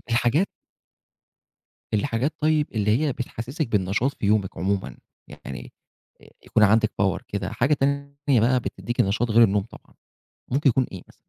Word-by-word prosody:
الحاجات 120 +10 +2 1.5
الحاجات 120 +6 0
طيب 155 -1 +2
اللي 105 +1 +2
هي 150 -3 +1
بتحسسِك 125 +4 -4
بالنشاط 105 +6 0
في - - -3
يومِك 100 -2 +1
عمومًا، 95 -7 -2 0.3
يعني 65 - -9 0.7
يكون 110 - +2
عندِك 110 +1 +4
power 95 -2 +1
كده، 100 -2 -3
حاجة 140 +5 +2
تانية 140 -1 0
بَقى 125 +3 +3
بتديكِ 120 0 -4
نشاط 115 +4 +1
غير 115 +2 +6
النوم 100 -1 +2
طبعًا، 115 - -16 0.5
ممكن 140 +3 +2
يكون 130 +1 +1
إيه 95 - -8
مثلًا؟ - - -19
115 Hz, 145 wpm, -24 LUFS, 100-140 Hz, 1.5 s, غير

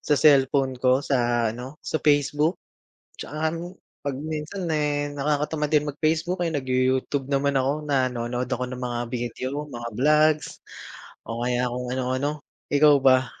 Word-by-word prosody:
sa 150 - +5
cellphone 135 -2 +4
ko, 130 +2 +3
sa 120 -4 +1
ano, 125 +5 -8
sa 155 - -2
Facebook. 150 +2 +2 0.6
'Tsaka - - -8
alam 155 +1 -1
mo, 170 +1 -6 0.4
'pag 140 - -1
minsan, 155 +4 -4
eh, 145 -2 0
nakakatamad 150 +1 0
din 150 -1 +3
mag-Facebook, 160 +5 -1
eh, 165 - -2
nagyu 130 -3 -1 0.2
Youtube 135 +1 -2
naman 140 0 +1
ako, 135 +1 +2 0.2
nanonood 125 -2 0
ako 125 - -2
ng 125 0 -6
mga 120 -1 -2
video, 130 +4 -4
mga 120 -5 -7
vlogs 150 +3 +3 0.8
o 115 +1 -5
kaya 125 0 0
kung 125 0 -4
ano-ano. 130 +3 -2 0.3
Ikaw 145 0 +6
ba? 130 -1 +5
140 Hz, 150 wpm, -25 LUFS, 125-150 Hz, 0.8 s, Ikaw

